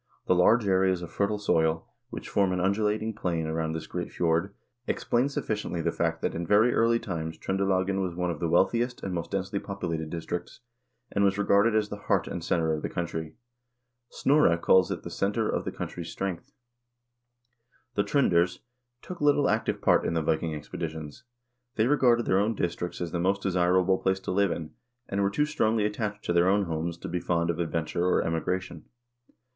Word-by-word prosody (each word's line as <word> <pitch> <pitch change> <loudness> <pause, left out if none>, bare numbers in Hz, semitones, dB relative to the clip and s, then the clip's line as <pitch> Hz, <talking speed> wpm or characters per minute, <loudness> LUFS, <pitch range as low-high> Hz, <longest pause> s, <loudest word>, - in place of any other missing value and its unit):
The - - +3
large 105 +5 +4
areas 95 -1 +2
of 85 - -8
fertile 100 +1 0
soil, 80 -5 +1 0.2
which - - -7
form 100 -2 +2
an 90 - -1
undulating 105 +3 0
plain 85 -5 -2
around 80 0 -2
this 80 - -4
great - - -5
fjord, 85 +3 0 0.4
explain 125 +4 +1
sufficiently 105 -9 -3
the 80 - 0
fact - - -1
that - - 0
in 85 - -3
very 110 +6 +4
early 115 +1 +3
times 80 -6 -5
Tr0ndelagen 95 +1 0
was 90 -3 -3
one 90 0 -1
of 80 - -6
the 85 - -1
wealthiest 120 +8 +1
and 95 - -3
most 85 -1 -3
densely 100 +1 -2
populated 85 -6 -4
districts, 85 +5 -5 0.5
and 100 - +1
was 100 0 +2
regarded 100 +2 +3
as 105 -1 +1
the 105 - -5
heart - - 0
and - - -5
center 80 -1 +1
of 75 - -2
the - - -3
country. 80 -2 -4 0.8
Snorre 135 - +3
calls 95 +1 +4
it - - -4
the - - -7
"center 105 +3 0
of - - -1
the - - -2
coun - - -4
try's - - -7
strength." 95 -3 -4 1.4
The 100 - +1
Tr0nders 95 -7 +2 0.5
took 180 -3 -8
little 145 -1 +4
active 110 0 -1
part - - +4
in 85 - -1
the 80 - +1
Viking 80 0 0
expeditions. 80 - -7 0.5
They 110 - +2
regarded 120 -3 +3
their 95 - +3
own 110 +3 +1
districts 90 -1 -3
as 85 -2 -3
the 85 - -2
most 95 +3 +1
desir 90 -1 +3
able 95 +1 +2
place 95 0 0
to - - -4
live 100 +1 +2
in, 80 -2 -4 0.4
and 100 0 -1
were 100 - +2
too 150 +9 +1
strongly 110 -8 +1
attached 105 0 -3
to 85 - 0
their 85 +1 +4
own 100 +1 +3
homes 85 -1 -3
to - - -7
be 90 - -2
fond 85 -1 0
of 85 - -6
adventure 85 0 -1
or 90 - +2
emigration. 85 +1 -3
95 Hz, 195 wpm, -27 LUFS, 85-105 Hz, 1.4 s, large